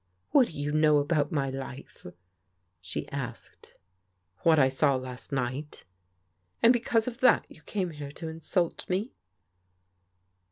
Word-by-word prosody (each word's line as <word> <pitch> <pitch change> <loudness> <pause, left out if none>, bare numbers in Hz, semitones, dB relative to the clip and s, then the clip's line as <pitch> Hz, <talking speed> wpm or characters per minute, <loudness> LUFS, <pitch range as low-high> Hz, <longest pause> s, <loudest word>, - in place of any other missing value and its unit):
" - - -46
What 270 -5 +6
do - - -10
you 145 0 -1
know 155 0 +4
about 145 +2 +1
my 140 -4 0
life? 135 -5 -8 0.7
she 90 -1 -5
asked. 125 -4 -7 0.3
" 90 -1 -48
What 165 -1 +5
I 135 -3 +6
saw 135 +1 +2
last 130 -1 -7
night." 135 +3 -3 0.4
" 90 0 -41
And 235 - +8
because 230 -1 +1
of 240 -2 -5
that 255 - +5
you 160 - -15
came 185 +1 -3
here 145 -2 -7
to 165 - -7
insult 165 +2 -1
me? 195 +7 -1
145 Hz, 155 wpm, -28 LUFS, 130-170 Hz, 0.7 s, And